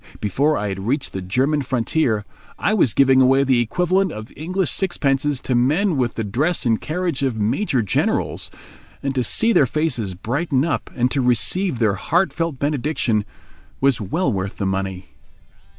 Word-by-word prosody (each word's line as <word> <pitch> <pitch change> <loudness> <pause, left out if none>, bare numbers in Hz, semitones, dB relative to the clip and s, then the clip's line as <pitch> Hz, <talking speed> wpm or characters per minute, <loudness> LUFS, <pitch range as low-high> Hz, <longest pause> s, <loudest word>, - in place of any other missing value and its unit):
Before 140 +9 +1
I 105 - -2
had 95 +1 -5
reached 140 +3 -1
the 95 - -4
German 130 +11 0
frontier, 125 -3 0 0.3
I 215 - +1
was 160 - +2
giving 135 -1 +5
away 135 +1 +4
the 130 -3 +2
equivalent 180 - +1
of 110 -3 -8
English 180 +3 -1
sixpences 145 -6 0
to 130 - -2
men 150 +10 +2
with 125 -3 -1
the 115 - -2
dress 140 - 0
and 115 -2 +1
carriage 170 -2 -2
of 130 -4 0
major 115 - 0
generals; 100 - -1 0.5
and 140 -1 -1
to 130 -2 0
see 225 - +1
their 140 - +4
faces 120 - -1
brighten 135 - -1
up 165 - -2
and 125 0 +1
to 140 - 0
receive 125 - +2
their 110 -3 +2
heartfelt 165 - 0
benediction 140 -6 0 0.5
was 135 -4 +2
well 135 - -1
worth 95 0 -4
the 100 - -2
money. 95 -1 -3
135 Hz, 165 wpm, -21 LUFS, 110-155 Hz, 0.5 s, giving